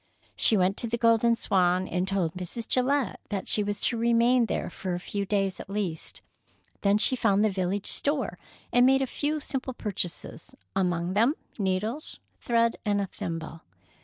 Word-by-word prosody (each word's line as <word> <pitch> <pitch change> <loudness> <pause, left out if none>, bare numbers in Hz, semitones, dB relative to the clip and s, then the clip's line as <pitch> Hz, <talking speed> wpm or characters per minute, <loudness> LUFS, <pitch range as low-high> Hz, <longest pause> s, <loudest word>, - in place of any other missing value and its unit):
She 220 - +4
went 185 +1 +2
to 235 - -2
the 235 +1 -1
Golden 230 0 +4
Swan, 185 -3 +1
and 180 +2 -1
told 190 -4 0
Mrs. 185 +5 -6
Gillette 265 +1 +1
that 200 -2 -3
she 210 - +2
was 205 0 -2
to 235 - +1
remain 235 +1 +3
there - - -2
for 185 -3 -4
a - - -4
few 200 +2 -4
days 195 -2 0
at - - -9
least, 195 -6 -4 0.6
then 200 0 +3
she 235 +4 +4
found 210 -4 +2
the 215 - +2
village 190 +1 -2
store 275 - 0 0.3
and 245 - +6
made 270 0 +4
a - - +1
few 300 +4 -2
simple 265 -2 -3
purchases, 210 +5 -4 0.2
among 180 -2 0
them 230 +9 +3 0.2
needles, 210 - -2 0.2
thread, 230 -1 +1
and 205 -2 +1
a 200 - 0
thimble. 165 -3 -6
205 Hz, 175 wpm, -27 LUFS, 185-235 Hz, 0.6 s, and